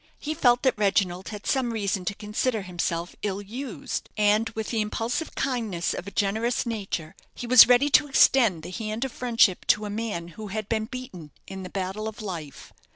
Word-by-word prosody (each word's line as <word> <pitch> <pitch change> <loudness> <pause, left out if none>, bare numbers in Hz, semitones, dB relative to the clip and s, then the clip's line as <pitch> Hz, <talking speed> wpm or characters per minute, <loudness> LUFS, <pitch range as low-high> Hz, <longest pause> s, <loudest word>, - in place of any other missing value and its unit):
He 305 - -4
felt 245 -4 +3
that 260 -5 +2
Reginald 190 -3 +1
had 210 -2 -8
some 260 -3 +1
reason 200 -4 -2
to 200 - -2
consider 210 +1 -2
himself 175 -1 -3
ill 200 -2 -2
used; 235 +5 -6
and 210 +2 +3
with 220 -1 -3
the 225 -2 +1
impulsive 225 +8 -3
kindness 225 -10 -1
of 180 - -6
a - - -6
generous 220 +6 0
nature, 195 -7 -4 0.2
he - - -6
was 245 0 +9
ready 250 +4 +4
to 300 - +5
extend 235 - +4
the 175 - -7
hand 220 +4 -3
of 265 - -5
friendship 230 -7 +2
to 215 - +3
a 205 - -4
man 205 -6 -4
who 215 +5 -9
had 215 +1 -4
been 220 -1 -1
beaten 250 - -8 0.2
in 190 0 -8
the 185 - -7
battle 195 +3 -3
of 220 +1 -7
life. 170 - -7
215 Hz, 195 wpm, -26 LUFS, 190-240 Hz, 0.2 s, was